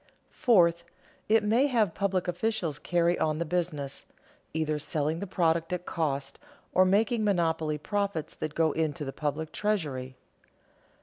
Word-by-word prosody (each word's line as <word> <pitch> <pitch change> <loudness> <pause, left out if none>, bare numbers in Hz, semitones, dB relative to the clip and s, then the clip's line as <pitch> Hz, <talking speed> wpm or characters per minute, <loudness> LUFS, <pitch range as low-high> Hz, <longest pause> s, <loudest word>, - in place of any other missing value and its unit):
Fourth, 170 -8 +4 0.5
it 220 0 +5
may 230 +7 +3
have 220 - +2
public 190 -2 0
officials 175 -4 -1
carry 175 0 +1
on 155 -1 +1
the 170 - -1
business, 155 -5 -3 0.4
either 155 -1 -1
selling 150 +2 -1
the 200 - -4
product 165 -2 +1
at 180 0 -3
cost 145 -4 -2 0.3
or 185 - +5
making 215 +4 +2
monopoly 165 -6 +1
profits 200 -1 -2
that 155 -1 -5
go 160 -1 +3
into 155 -2 -2
the 135 - -5
public 150 +2 -3
treasury. 145 -12 -2
170 Hz, 140 wpm, -28 LUFS, 155-200 Hz, 0.5 s, it